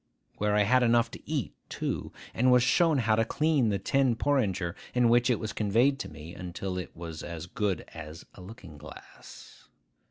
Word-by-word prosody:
Where 105 0 +1
I 105 - +4
had 130 +5 +3
enough 120 -1 +3
to - - -12
eat 145 - -2 0.2
too, - - -4 0.2
and 125 +2 +3
was 125 -1 +5
shown 165 +3 +3
how 115 -4 +2
to 115 - +2
clean 145 0 +1
the 100 - 0
tin 130 +5 +1
porringer 100 -11 0 0.2
in 125 -1 +4
which 120 +1 +4
it 120 - +2
was 110 -2 -4
conveyed 120 +7 +2
to - - -5
me, 80 +2 -10
until 90 +1 -5
it 90 - -8
was 80 -2 -7
as 85 -2 -6
good 95 0 -2
as 80 0 -9
a - - -13
looking 90 -6 -12
glass. 75 - -14
110 Hz, 190 wpm, -28 LUFS, 90-125 Hz, 0.2 s, was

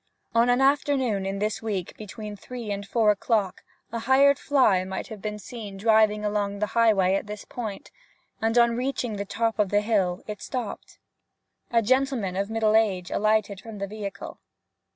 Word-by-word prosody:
On 235 +1 +4
an 245 +2 +3
afternoon 270 -7 +2
in 195 +1 -3
this 210 +2 -2
week 200 -5 -3
between 210 0 -8
three 235 +1 -7
and 200 0 -4
four 220 -2 +3
o'clock 205 -2 0 0.3
a 230 - -3
hired 270 +4 +4
fly 235 -10 +3
might 190 0 -5
have 215 -3 -8
been 210 -1 -4
seen 210 -2 -8
driving 215 0 +3
along 205 -1 -1
the 210 - 0
highway 210 -5 +4
at 195 - -1
this 210 0 -7
point, 220 -5 -6 0.5
and 225 +1 +1
on 235 -1 +5
reaching 245 -3 -2
the 200 - -3
top 225 +2 -1
of 205 -2 +2
the 205 +1 +2
hill 195 -5 0
it 210 -1 -7
stopped. 245 -6 -6 0.7
A 230 -1 +2
gentleman 255 -5 +1
of 200 +2 -1
middle 220 -1 +2
age 195 -5 +1
alighted 215 -2 +1
from 225 -2 -9
the 200 - -3
vehicle. 200 -1 -7
215 Hz, 175 wpm, -26 LUFS, 200-230 Hz, 0.7 s, on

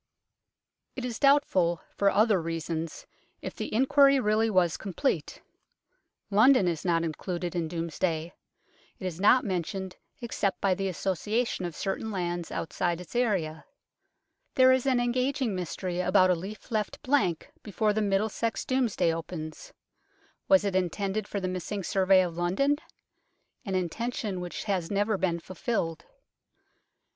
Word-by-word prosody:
It 255 - -4
is 240 -2 -4
doubtful, 190 - +3 0.2
for 200 - +3
other 210 -2 +3
reasons, 165 0 -4 0.4
if - - -5
the - - -5
inquiry 275 +3 +5
really 220 0 +2
was 180 -5 +2
complete. 210 +8 -2 0.9
London 215 0 +5
is 165 -3 -1
not 170 -2 +1
included 175 +2 -3
in 170 -2 -1
Domesday; 165 0 -2 0.6
it - - -8
is 175 -2 -4
not 245 +5 +5
mentioned 190 0 -3 0.2
except 215 -5 -2
by 195 -2 +2
the 195 +1 -2
association 195 +4 -1
of 170 -3 -5
certain 195 +3 -3
lands 175 -4 -3
outside 175 +1 -2
its 180 +6 -11
area. 185 -10 0 0.9
There 260 0 +7
is 260 +1 +2
an 255 -2 +3
engaging 250 0 0
mystery 180 0 -3
about 185 0 +4
a - - +3
leaf 195 +8 -8
left 215 -2 -2
blank 255 - +1
before 210 0 0
the 215 - 0
Middlesex 210 +3 0
Domesday 245 -10 +1
opens. 165 - -7 0.8
Was 285 -6 +5
it 195 -2 -1
intended 195 +3 -1
for 200 - -3
the 185 - -2
missing 185 +2 -4
survey 190 0 +4
of 170 -2 -4
London? 190 +13 +1 0.9
an 195 -2 -2
intention 195 +1 -2
which 175 -1 -5
has 190 -5 -1
never 205 +1 +1
been 185 -3 0
fulfilled. 175 -2 -3
195 Hz, 140 wpm, -28 LUFS, 175-225 Hz, 0.9 s, There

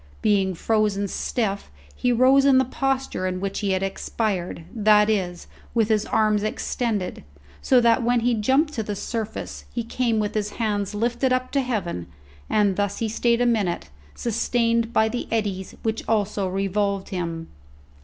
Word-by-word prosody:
Being 195 -3 +2
frozen 210 0 +1
stiff 200 0 -2 0.3
he 250 - +1
rose 260 +3 +5
in 275 -1 +5
the 260 - +4
posture 265 -7 -1
in 185 0 -2
which 195 +1 -3
he 200 -2 0
had 190 0 0
expired, 195 -3 -2
that 210 -1 +4
is, 180 -4 -2 0.3
with 225 -2 +2
his 215 -1 +1
arms 215 -1 +2
extended; 215 -2 -2 0.4
so 255 - +4
that, 235 +1 +4
when 240 0 +2
he 245 +1 +2
jumped 265 +8 +2
to 225 - -2
the 210 -1 -4
surface, 220 +1 -5
he 235 - -3
came 235 0 0
with 210 -1 -1
his 210 -1 -2
hands 205 -3 -1
lifted 240 +4 0
up 255 0 0
to 280 - +2
heaven, 190 - -3 0.4
and 205 -3 +2
thus 205 -1 0
he 225 - -1
stayed 235 +2 +1
a - - +3
minute, 200 - 0 0.2
sustained 230 0 0
by 220 -2 +3
the 240 +2 -3
eddies 200 -4 -2
which 220 0 -1
also 205 -3 +1
revolved 195 +1 -1
him. 165 -3 -4
215 Hz, 165 wpm, -24 LUFS, 195-235 Hz, 0.4 s, rose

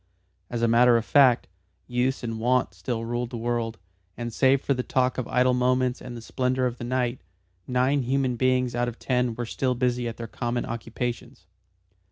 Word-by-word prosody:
As 120 -1 -2
a - - +4
matter 120 +1 +5
of 115 - -2
fact, 130 -4 +5 0.4
use 125 +2 -1
and 115 -1 -3
wont 125 -3 +1
still 115 +6 -4
ruled 120 +1 -2
the 120 - -6
world, 115 -1 -2 0.4
and 120 0 -4
save 135 +3 +4
for 140 - 0
the 125 - -1
talk 130 0 0
of 125 - -3
idle 125 0 +3
moments 125 0 +1
and 120 -1 -7
the 115 - -9
splendour 130 +1 0
of 125 -1 -3
the - - -5
night, 125 -1 -1 0.5
nine 130 +3 +2
human 130 0 0
beings 130 0 +1
out 120 0 0
of 120 -1 -5
ten 125 -2 0
were 120 - -3
still 125 +2 -1
busy 125 -1 0
at 115 - -5
their 115 - -5
common 120 +1 -3
occupations. 115 +1 -5
125 Hz, 195 wpm, -26 LUFS, 120-130 Hz, 0.5 s, matter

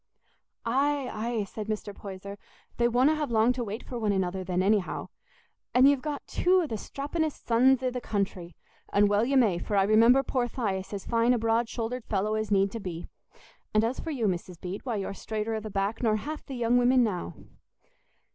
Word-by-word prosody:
"Aye, 275 +3 +1
aye," 225 0 -2
said 210 +1 -7
Mr. 210 -1 -4
Poyser; 200 0 -8 0.4
"they 235 - +3
wonna 255 +6 +3
have 305 -2 -2
long 230 +1 +3
to 250 -1 -3
wait 215 +1 -5
for 245 - -6
one 215 -2 +1
another 190 -1 -1
then, 180 0 0
anyhow. 200 -1 0 0.7
And 255 +2 +7
ye've 280 -2 +3
got 295 0 -4
two 365 0 +2
o' - - -1
the 280 - -6
strapping'st 290 +7 -3
sons 255 +2 +4
i' 255 - +1
th' 250 0 -4
country; 190 -6 -3 0.4
and 205 0 +4
well 205 +1 +3
you 270 +3 +2
may, 210 -9 +3
for 205 - -3
I 195 - +5
remember 230 +6 +5
poor 250 -2 0
Thias 200 -7 -3
as 200 -2 -5
fine 235 +1 +3
a - - +1
broad 225 +1 +1
shouldered 235 +1 -4
fellow 210 +1 0
as 215 -1 -1
need 195 -1 +3
to 230 - -5
be; 175 -4 -6 0.7
and 215 - +5
as 235 +3 -1
for - - -5
you, 260 -8 -1
Mrs. 180 -2 -2
Bede, 185 +2 -6
why 235 - -1
you're 195 -1 -3
straighter 220 +2 -3
i' 220 - -1
the 215 0 -7
back 200 +2 -2
nor 220 -3 +2
half 300 +8 -5
the 270 - -6
young 240 0 +2
women 250 +1 +4
now." 180 - -2
225 Hz, 210 wpm, -28 LUFS, 200-250 Hz, 0.7 s, And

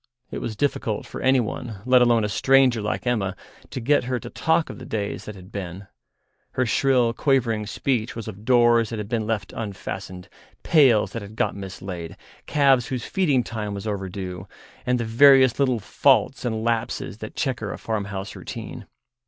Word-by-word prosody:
It - - -4
was 115 -2 -4
difficult 110 -4 -1
for - - -8
anyone, 120 -4 0
let 125 0 +5
alone 120 -2 +4
a - - +1
stranger 130 +2 +3
like 105 +4 -3
Emma, 105 -6 0 0.3
to - - -5
get 130 +2 +2
her 125 0 -1
to - - -8
talk 160 0 +1
of - - -10
the - - -9
days 105 -2 -3
that 105 - -7
had 95 +1 -13
been; 95 -1 -6 0.7
her 130 - +1
shrill, 125 0 +2
quavering 115 -7 +1
speech 120 +1 -1
was 115 -1 -6
of 105 -1 -8
doors 120 -2 +4
that 115 - -4
had 105 -1 -4
been 110 -1 -2
left 110 -4 -2
unfastened, 95 -3 -6 0.4
pails 135 -9 +4
that 115 - -5
had 100 +2 -10
got - - 0
mislaid, 95 -3 -7 0.3
calves 135 -5 +3
whose 125 -3 -4
feeding 145 -10 +1
time 105 -3 -4
was 100 - -6
overdue, 95 -2 -5 0.4
and 125 0 +2
the 115 - -1
various 130 +2 +6
little 130 -4 +2
faults 100 - +2
and 110 -2 -2
lapses 115 -2 -2
that 110 - -8
chequer 120 -7 -2
a - - -6
farmhouse 100 -3 -4
routine. - - -8
115 Hz, 175 wpm, -24 LUFS, 100-125 Hz, 0.7 s, various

